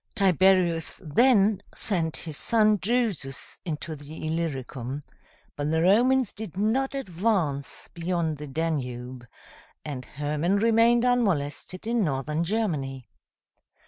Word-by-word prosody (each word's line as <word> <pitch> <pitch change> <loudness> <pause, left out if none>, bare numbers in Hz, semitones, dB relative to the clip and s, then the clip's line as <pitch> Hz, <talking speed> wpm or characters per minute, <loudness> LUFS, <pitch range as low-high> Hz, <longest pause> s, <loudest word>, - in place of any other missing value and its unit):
Tiberius 185 -4 +3
then 205 - +3
sent 165 -6 +1
his 155 -3 -5
son 215 +3 +4
Drusus 210 - -2
into 160 -1 -4
the 150 +2 -9
Illyricum; 140 -4 -3 0.5
but 145 0 -2
the 160 +1 +1
Romans 245 +5 +3
did 205 -4 -8
not 255 +7 0
advance 180 - -2
beyond 170 -2 -1
the 150 - -6
Danube, 130 -5 -3 0.6
and 140 -4 -5
Hermann 150 +6 -1
remained 230 +2 +4
unmolested 185 -7 0
in 230 -1 +1
Northern 150 +1 -1
Germany. 155 - -2
170 Hz, 110 wpm, -26 LUFS, 145-215 Hz, 0.6 s, son